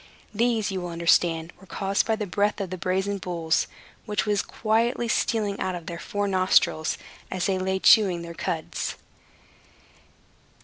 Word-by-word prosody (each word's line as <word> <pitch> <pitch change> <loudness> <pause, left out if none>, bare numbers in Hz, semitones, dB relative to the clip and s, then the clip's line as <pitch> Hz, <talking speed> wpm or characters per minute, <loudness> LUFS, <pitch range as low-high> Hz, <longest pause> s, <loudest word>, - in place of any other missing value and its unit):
These, 225 -1 +1
you 190 -1 -3
will 175 - -5
understand, 170 0 +2
were 190 - -16
caused 195 +4 0
by 220 - +2
the 215 -1 -3
breath 205 +3 0
of 190 -3 -4
the 185 - -3
brazen 190 +3 -1
bulls, 170 -3 0 0.4
which 210 0 0
was 205 -2 +1
quietly 230 +2 0
stealing 210 -2 0
out 185 -1 -1
of 170 -2 -7
their 170 0 -6
four 205 +2 -2
nostrils, 185 -4 +2 0.3
as 185 -1 -2
they 190 -1 +1
lay 190 +1 0
chewing 190 -3 +5
their 170 0 -7
cuds. 160 -1 -3
190 Hz, 160 wpm, -25 LUFS, 175-210 Hz, 0.4 s, chewing